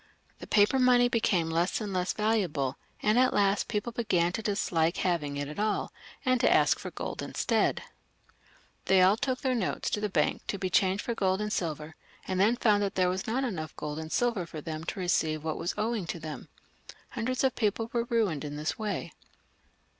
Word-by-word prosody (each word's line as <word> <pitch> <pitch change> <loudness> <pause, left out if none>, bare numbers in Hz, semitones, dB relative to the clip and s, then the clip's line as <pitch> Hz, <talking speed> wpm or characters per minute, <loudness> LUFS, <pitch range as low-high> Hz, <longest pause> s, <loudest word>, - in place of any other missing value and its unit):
The - - -9
paper 210 +5 +4
money 245 -1 +5
became 185 -8 +1
less 170 +3 +1
and 210 -3 -4
less 180 0 0
valuable, 185 - 0 0.3
and 215 +3 +4
at 255 0 +3
last 200 0 +2
people 210 +3 -2
began 185 -7 +1
to 205 - -3
dislike 175 -6 0
having 150 -6 -1
it 145 0 -3
at 150 +6 -7
all, 210 0 -1 0.3
and 255 -2 +2
to - - +4
ask - - +4
for - - -6
gold - - -5
instead. - - 0 1.0
They 190 -1 +5
all 190 +3 +5
took 255 +1 -2
their 260 -1 +1
notes 225 -7 -1
to 210 - -1
the 210 - -1
bank - - +1
to 200 - -2
be 185 -1 -3
changed 190 +2 +2
for 235 - -2
gold 190 -3 +1
and 210 0 -2
silver; 155 -2 -3 0.3
and 185 0 -1
then 215 +5 +4
found 210 -4 +3
that 200 -1 -1
there 185 -1 +3
was 185 +1 -3
not 250 +5 0
enough 170 -11 -4
gold 150 0 -5
and 160 0 -7
silver 235 -8 0
for 155 - -7
them 155 +1 -6
to 195 - -4
receive 160 -4 0
what 160 -1 -3
was 170 - -2
owing 215 -4 -1
to 170 - -4
them. 155 -1 -7 0.6
Hundreds 250 +2 -2
of 265 -2 +3
people 225 +1 -1
were 235 -1 0
ruined 215 -11 0
in 145 -1 -5
this 150 -1 -3
way. 200 -6 -3
195 Hz, 205 wpm, -29 LUFS, 165-225 Hz, 1.0 s, money